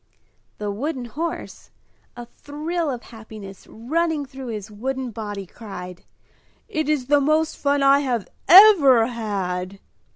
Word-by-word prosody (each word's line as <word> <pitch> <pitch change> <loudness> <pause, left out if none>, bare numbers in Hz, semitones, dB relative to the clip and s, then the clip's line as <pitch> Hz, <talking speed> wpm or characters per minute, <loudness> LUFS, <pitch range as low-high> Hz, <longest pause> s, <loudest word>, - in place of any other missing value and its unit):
The 210 -1 -3
wooden 255 +4 -4
horse, 320 +8 -6 0.5
a 240 - -7
thrill 305 +6 -4
of 245 -3 -5
happiness 215 -4 -12
running 310 +5 -2
through 265 -1 -9
his 215 -2 -6
wooden 255 +4 -4
body, 205 -3 -6
cried, 180 -3 -10 0.6
"It 310 -1 -2
is 295 -5 0
the 290 +2 +3
most 310 +2 +1
fun 285 0 0
I 275 +1 +6
have 245 -7 -2 0.2
ever 335 - +8
had!" 195 -5 -4
250 Hz, 130 wpm, -22 LUFS, 210-295 Hz, 0.6 s, ever